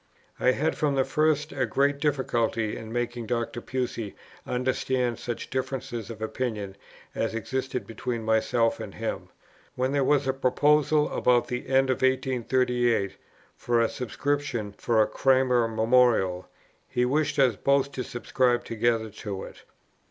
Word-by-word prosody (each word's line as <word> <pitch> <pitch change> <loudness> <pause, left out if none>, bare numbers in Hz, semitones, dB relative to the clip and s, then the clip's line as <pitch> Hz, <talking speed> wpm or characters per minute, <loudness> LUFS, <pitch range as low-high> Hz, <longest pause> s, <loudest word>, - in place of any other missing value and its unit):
I 130 - +4
had 155 +5 0
from 145 -2 0
the 135 - +3
first 150 +2 +1
a 130 -3 -1
great 140 +4 +1
difficulty 120 -6 0
in 110 0 -8
making 120 -1 -3
Dr. 120 +1 -2
Pusey 120 -5 -3 0.3
understand 125 -1 0
such 120 -2 -5
differences 125 -4 -3
of 110 -1 -7
opinion 110 -4 -3 0.4
as 115 0 -2
existed 130 +3 -3
between 115 0 -4
himself 115 +1 +2
and - - -8
me. - - -1 0.6
When 130 +1 0
there 140 -1 +2
was 140 0 +3
a 130 - +2
proposal 150 +3 +3
about 125 -1 +3
the 125 0 -4
end 135 0 +3
of 130 - 0
1838 125 -4 +1 0.4
for 120 -1 0
a 115 - +3
subscription 125 -3 -2
for 110 -2 +2
a - - -1
Cranmer 130 -3 +3
Memorial, 110 -5 +2 0.4
he 125 0 +1
wished 145 +3 0
us 130 -5 +4
both 140 +4 +2
to 130 - -4
subscribe 120 +1 0
together 115 -1 0
to 100 -2 -6
it. - - -11
125 Hz, 145 wpm, -27 LUFS, 115-135 Hz, 0.6 s, I